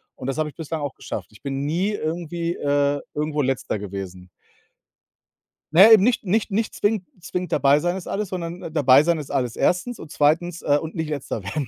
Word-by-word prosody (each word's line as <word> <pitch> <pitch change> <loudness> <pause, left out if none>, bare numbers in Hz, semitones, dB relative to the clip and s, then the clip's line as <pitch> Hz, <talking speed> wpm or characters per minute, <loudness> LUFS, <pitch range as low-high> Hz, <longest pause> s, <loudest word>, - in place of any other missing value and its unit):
Und 130 - -9
das 135 +3 -2
habe 155 -1 0
ich - - -16
bislang 160 -1 -5
auch 145 -2 -4
geschafft. - - -7
Ich - - -19
bin 140 0 -3
nie 175 +8 0
irgendwie 170 -1 -3
äh, 145 0 +1
irgendwo 150 0 -1
Letzter 130 -4 -1
gewesen. 95 -2 -7 1.5
Ne, 200 +6 +9
eben 210 -3 +8
nicht 245 -1 +2
nicht 210 +2 0
nicht 220 +2 -1
zwingend 205 -3 0
zwingend 180 +1 -4
„dabei 140 +1 +4
sein 175 +4 -1
ist 185 - -8
alles“, 205 -1 -2
sondern 170 -2 -5
„dabei 140 -3 +6
sein 170 +1 +1
ist 145 -2 -7
alles 125 -4 -1
1.“ 220 +7 0
und 160 - -11
2., 165 +4 +1
äh, 145 0 +3
und 160 +1 -7
nicht 160 -2 -3
Letzter 135 -7 -4
werden. 130 +7 -3
155 Hz, 200 wpm, -23 LUFS, 140-180 Hz, 1.5 s, Ne